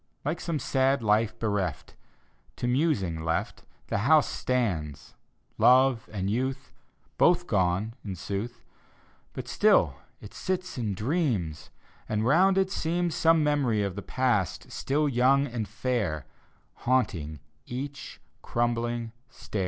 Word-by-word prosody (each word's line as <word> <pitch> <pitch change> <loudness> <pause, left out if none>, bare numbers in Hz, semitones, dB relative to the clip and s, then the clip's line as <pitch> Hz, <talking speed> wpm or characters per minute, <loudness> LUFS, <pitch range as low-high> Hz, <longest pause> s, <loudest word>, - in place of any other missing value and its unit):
Like 160 +4 -2
some 165 -3 -2
sad 135 -1 +1
life 110 +1 +2
bereft, 100 -8 -2 0.6
To - - -4
musing 120 - 0
left, 80 0 -2 0.2
The - - -1
house 150 +7 +4
stands: 90 - -2 0.5
love 130 -2 +4
and 95 -3 -3
youth 130 +6 -2 0.5
Both 175 0 +4
gone, 95 - 0
in 100 -3 -5
sooth: 110 +6 -5 0.7
But - - -6
still - - +3 0.2
it 105 - -12
sits 185 -1 -3
and 110 -6 -2
dreams: 105 - -1 0.4
And 110 0 0
round 185 +8 +4
it 190 0 +2
seems 170 -1 -1
Some 165 -1 +4
memory 135 -8 +1
of 100 -2 -2
the 100 - -4
past, 120 -9 -1
still 150 +2 0
young 135 +2 +3
and 115 -5 -4
fair, 105 - -2 0.5
Haunting 85 - 0 0.3
each 140 +3 -6 0.2
crumbling 120 -1 -1 0.2
stair. 110 -3 -6
120 Hz, 125 wpm, -27 LUFS, 100-140 Hz, 0.7 s, house